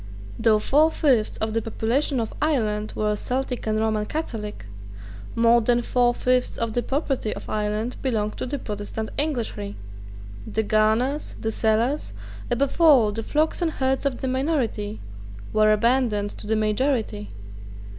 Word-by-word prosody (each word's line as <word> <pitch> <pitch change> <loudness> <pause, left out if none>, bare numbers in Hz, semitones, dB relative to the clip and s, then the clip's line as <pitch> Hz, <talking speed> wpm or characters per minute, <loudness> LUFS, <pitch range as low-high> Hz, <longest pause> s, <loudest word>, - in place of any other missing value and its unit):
Though 225 -2 +4
four 295 +9 +4
fifths 260 -9 +1
of 220 0 -2
the 225 - +1
population 240 +5 0
of 225 - -3
Ireland 215 -9 0
were 210 0 0
Celtic 250 +2 -3
and 215 0 +1
Roman 215 -1 0
Catholic, 220 - -5 0.7
more 230 +1 +5
than 240 +1 +2
four 245 0 +2
fifths 250 0 +1
of 230 -1 -2
the 245 - +1
property 270 -4 -1
of - - -8
Ireland 215 +3 -2
belonged 215 -5 -1
to - - -3
the 285 - -2
Protestant 210 -1 -5
Englishry. 235 - -2 0.8
The 220 - 0
garners, 220 +7 +1
the 220 - -2
cellars, 225 +6 0 0.4
above 265 +6 0
all 270 -10 +6
the 225 +2 -3
flocks 310 +8 0
and 330 -2 0
herds 265 +1 0
of 260 -3 -2
the 265 - -1
minority, 255 -6 -1 0.5
were 215 0 +4
abandoned 215 -2 +2
to - - -7
the 220 - +1
majority. 215 - 0
230 Hz, 150 wpm, -24 LUFS, 215-265 Hz, 0.8 s, all